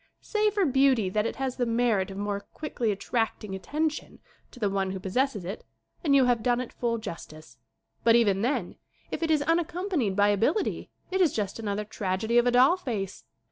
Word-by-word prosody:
Say 425 -1 +1
for 410 -2 +1
beauty 265 - +3
that 210 +3 +1
it - - -4
has 265 -1 -3
the 245 - +1
merit 230 -5 +1
of 195 - -8
more 205 0 -2
quickly 230 +1 -3
attracting 210 0 -2
attention 300 - -3 0.3
to 250 - -15
the 210 - +1
one 195 -1 -1
who 190 0 -4
possesses 205 +1 -1
it 195 +4 -6 0.4
and 285 -4 +3
you 270 -2 +6
have 245 -2 +2
done 245 +1 +2
it 255 - -5
full 235 -1 -1
jus 215 -7 -7
tice. 155 -3 -15 0.5
But 230 0 +6
even 205 -5 +3
then, 250 +6 -1 0.3
if - - -3
it 330 - 0
is 305 -2 +3
unaccompanied 335 - 0
by 205 +1 +4
ability, 230 - 0 0.2
it 380 +1 +1
is 335 -6 +4
just 205 0 -3
another 210 -1 -2
tragedy 210 +3 0
of 240 - +2
a - - +4
doll 260 +9 +5
face. 215 - -4
235 Hz, 200 wpm, -27 LUFS, 200-275 Hz, 0.5 s, you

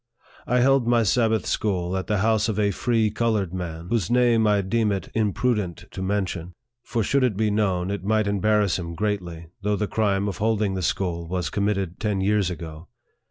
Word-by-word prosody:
I 125 0 +2
held 135 -1 +3
my 120 -1 +4
Sabbath 110 +1 +2
school 90 -3 -1
at 95 - -3
the 105 - +1
house 110 +2 +2
of 105 - -2
a 105 -1 +2
free 110 +1 +1
colored 105 -7 0
man, 85 -2 -5
whose 110 -8 0
name 120 -2 +3
I 105 -1 +3
deem 110 +2 +1
it 100 -1 -4
imprudent 105 -4 -1
to - - -6
men 100 +1 0
tion; 90 -1 -7 0.3
for 115 -2 -2
should 140 +6 +2
it 115 -6 +1
be 110 -1 +1
known, 95 -3 0
it 100 -2 -4
might 110 +1 +1
embarrass 100 -1 +1
him 85 -1 -6
greatly, 90 -5 -3
though 105 +1 0
the 105 - -1
crime 100 -2 0
of 95 -3 -3
holding 105 -2 +1
the 95 - -2
school 85 -1 -2
was 90 -2 -2
committed 100 -3 -1
ten 105 -3 -1
years 100 -1 +2
ago. 80 -2 -8
100 Hz, 200 wpm, -24 LUFS, 90-110 Hz, 0.3 s, my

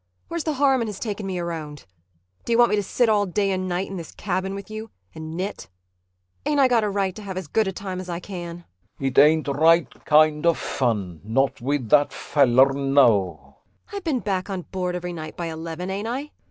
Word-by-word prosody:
Where's 335 -2 -3
the 310 - 0
harm 270 -2 +3
in 230 - -1
his 210 -2 -6
taking 210 -3 -4
me 185 -1 -3
around? 160 -4 -5 0.6
D'you 230 - +2
want 240 0 +5
me - - +4
to 205 - +1
sit 240 +4 +1
all 205 -2 +3
day 195 +2 0
and 185 -1 -2
night 180 +2 -1
in 195 - -6
this 165 -2 -7
cabin 190 0 -2
with 200 - -7
you 220 +1 -6 0.2
and 160 +1 -7
knit? 190 +3 -4 0.7
Ain't 295 0 +1
I 270 - +6
got 240 -3 +3
a 210 - 0
right 195 -2 -1
to 215 - -8
have 195 -2 -6
as 185 - -4
good 215 +8 +1
a - - 0
time 190 -1 -5
as 185 - -9
I 170 -1 -3
can? 175 -2 -7 0.3
CHRIS 135 - -2
It 130 - +3
ain't 155 +2 +5
right 160 +4 +2
kind 155 +1 +4
of 170 - +4
fun 100 - -2
not 125 +6 0
with 130 -2 -1
that 145 +2 +5
fallar, 135 -1 +3
no. 125 - +2 0.3
ANNA 405 - -6
I - - -2
been 310 -10 -1
back 190 -1 -2
on 190 -2 -3
board 180 -1 -3
every 180 0 -4
night 155 -2 -7
by 175 - -3
eleven, 165 +3 -5
ain't 200 +3 -3
I? 270 +5 -4
180 Hz, 225 wpm, -24 LUFS, 150-205 Hz, 0.7 s, I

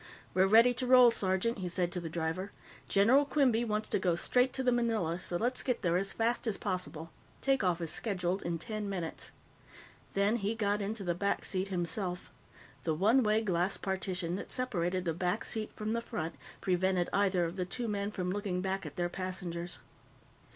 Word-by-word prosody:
"We're 190 +1 +4
ready 230 +4 +6
to 250 +1 -2
roll, 250 -1 +8
sergeant," 195 +2 0
he 180 -1 -3
said 175 0 0
to 180 - -2
the 170 -2 -5
driver. 165 +4 -3 0.4
"General 230 +8 +5
Quinby 270 -5 +2
wants 215 -1 -1
to - - +1
go 180 -2 +1
straight 250 +9 +2
to 265 - -1
the 250 - +3
Manila, 220 -8 0
so 175 - -2
let's 245 +6 0
get 250 -4 -1
there 170 -1 +2
as 195 +2 0
fast 230 +1 0
as 215 - 0
possible. 180 -4 -4 0.3
Take 270 -4 +1
off 180 -2 +1
is 165 -2 -2
scheduled 185 -2 -1
in 170 -1 -2
ten 210 +4 -4
minutes." 175 -5 -4 0.9
Then 200 +4 +3
he 210 +1 -1
got 205 -2 0
into 205 +1 -3
the 175 -2 0
back 200 +4 -1
seat 190 0 -1
himself. 180 0 -3 0.5
The 160 -2 0
one 220 +10 +4
way 215 -1 +2
glass 185 -1 0
partition 185 -2 -2
that - - -7
separated 185 -7 0
the 165 - 0
back 180 +5 -1
seat 220 -2 -3
from 215 +1 -2
the 230 - 0
front 165 -7 -4 0.3
prevented 185 -1 +1
either 190 -3 +2
of 170 +2 -4
the 185 -2 -2
two 235 +5 -3
men 200 -1 -1
from 180 -3 -3
looking 195 -2 -2
back 190 -1 -2
at 145 - -10
their 175 +2 0
passengers. 175 -1 -5
195 Hz, 195 wpm, -32 LUFS, 175-220 Hz, 0.9 s, roll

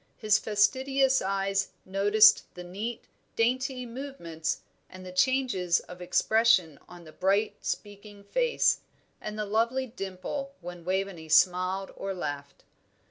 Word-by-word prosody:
His 215 -1 +3
fastidious 265 +5 +2
eyes 195 0 -1
noticed 205 +3 +5
the 180 - -8
neat, 210 +6 -5 0.3
dainty 255 +2 0
movements 230 - -5 0.3
and 185 0 -11
the 185 - -8
changes 190 -5 +2
of 180 0 -12
expression 185 -4 +2
on 175 -1 -12
the 155 - -13
bright, 200 +6 0
speaking 205 0 -6
face, 485 - +1 0.4
and 215 0 -6
the 210 - -2
lovely 230 +5 0
dimple 240 +5 -6
when 175 -1 -9
Waveney 185 -3 -2
smiled 185 +4 +3
or 195 0 -4
laughed. 145 -5 -6
200 Hz, 125 wpm, -28 LUFS, 180-235 Hz, 0.4 s, noticed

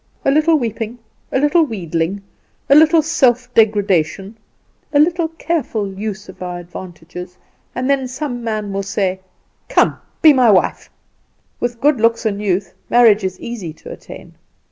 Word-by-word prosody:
A 275 - +4
little 310 +3 +4
weeping, 230 -2 -4 0.3
a - - +1
little 295 +5 +3
wheedling, 185 - -3 0.5
a - - +9
little 315 +2 +6
self 250 -6 +1
degradation, 200 -3 +1 0.6
a 290 - +2
little 335 +2 +2
careful 310 - -3
use 205 +1 -5
of 190 - -13
our 180 -1 -4
advantages, 175 0 -10 0.4
and 255 +1 -2
then 275 -2 +1
some 255 -2 -5
man 215 -3 -3
will 195 - -1
say: 195 -1 -2 0.5
"Come, - - +2 0.2
be 310 -2 +9
my 255 -4 +4
wife!" 195 -3 +2 0.7
With 240 -1 -3
good 285 -4 +2
looks 230 0 +2
and 205 -2 -1
youth 190 -2 -1 0.2
marriage 225 -4 +5
is 185 -1 -3
easy 210 -9 -6
to - - -12
attain. - - -11
220 Hz, 150 wpm, -18 LUFS, 190-270 Hz, 0.7 s, a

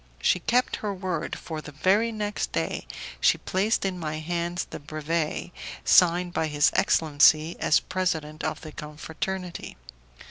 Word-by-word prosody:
She 485 +1 +3
kept 250 +1 +1
her 210 - -3
word, 185 -2 -3
for 160 -2 -6
the 150 - -10
very 195 +10 +2
next 210 -1 -3
day - - -2 0.3
she - - +4
placed 200 +3 0
in 185 -2 -2
my 155 -2 -3
hands 170 +2 -2
the - - -8
brevet, 155 +3 -2 0.3
signed 175 0 +5
by 160 - 0
his 150 0 +3
excellency 155 +1 +4
as - - +4
president 160 -5 -2
of 155 0 -2
the 155 - -8
confraternity. 160 +5 -6
170 Hz, 145 wpm, -26 LUFS, 155-185 Hz, 0.3 s, signed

